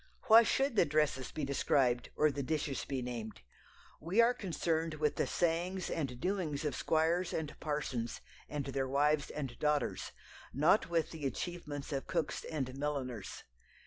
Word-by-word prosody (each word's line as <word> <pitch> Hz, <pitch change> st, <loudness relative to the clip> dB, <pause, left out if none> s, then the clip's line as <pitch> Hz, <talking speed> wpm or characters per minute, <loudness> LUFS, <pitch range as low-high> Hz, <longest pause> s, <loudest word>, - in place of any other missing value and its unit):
Why 225 Hz, +1 st, +9 dB
should 270 Hz, +2 st, +1 dB
the 200 Hz, -, +6 dB
dresses 150 Hz, -3 st, +1 dB
be 150 Hz, -, -3 dB
described 130 Hz, -3 st, +2 dB
or 150 Hz, 0 st, +4 dB
the 140 Hz, +1 st, -3 dB
dishes 145 Hz, 0 st, -2 dB
be 135 Hz, -2 st, -3 dB
named? 115 Hz, -3 st, -5 dB, 0.6 s
We 175 Hz, +8 st, -1 dB
are 235 Hz, +1 st, +6 dB
concerned 165 Hz, -5 st, -1 dB
with 150 Hz, -1 st, 0 dB
the -, -, +1 dB
sayings 175 Hz, +2 st, 0 dB
and 130 Hz, -6 st, -2 dB
doings 170 Hz, -5 st, -1 dB
of 150 Hz, -, -1 dB
squires 165 Hz, +3 st, +1 dB
and 155 Hz, -2 st, -2 dB
parsons 135 Hz, -6 st, -2 dB, 0.3 s
and 145 Hz, -2 st, -3 dB
their 135 Hz, -1 st, -1 dB
wives 145 Hz, +2 st, +2 dB
and 135 Hz, -5 st, -5 dB
daughters, 150 Hz, -1 st, 0 dB, 0.4 s
not 160 Hz, +7 st, +4 dB
with 165 Hz, -2 st, +1 dB
the 155 Hz, -4 st, -3 dB
achievements 150 Hz, +1 st, -5 dB
of 135 Hz, -, -3 dB
cooks 165 Hz, -4 st, -1 dB
and 135 Hz, -5 st, -3 dB
milliners. 130 Hz, -7 st, -3 dB
150 Hz, 155 wpm, -34 LUFS, 135-165 Hz, 0.6 s, Why